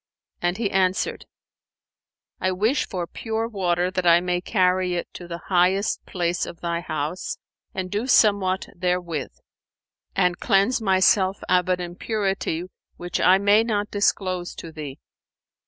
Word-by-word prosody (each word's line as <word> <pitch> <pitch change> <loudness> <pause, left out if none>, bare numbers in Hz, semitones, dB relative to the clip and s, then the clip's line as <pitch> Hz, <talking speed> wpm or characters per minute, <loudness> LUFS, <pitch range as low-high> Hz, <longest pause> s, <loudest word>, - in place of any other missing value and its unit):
and 175 +1 0
he 220 -3 -1
answered, 185 -1 0 1.1
"I 185 0 0
wish 220 +9 +1
for 180 -2 -3
pure 225 +5 -3
water 180 -4 0
that 185 -2 -1
I 170 0 +7
may 180 0 -1
carry 185 -2 +1
it 175 - -4
to 175 - -9
the 170 -1 -5
highest 185 +2 +2
place 175 -1 -1
of 170 - -9
thy 170 -1 -2
house 155 0 -4 0.4
and 185 -1 -3
do 210 +5 -1
somewhat 200 -6 +3
therewith 175 -5 -1 0.9
and 180 -2 +2
cleanse 205 +4 +2
myself 190 -1 +3
of 180 0 +2
an 180 0 +2
impurity, 190 -1 -2 0.3
which 175 0 -3
I 185 +1 +6
may 205 +2 +4
not 210 -2 -1
disclose 185 -3 0
to 165 - -8
thee." 150 -4 -7
185 Hz, 140 wpm, -24 LUFS, 175-200 Hz, 1.1 s, I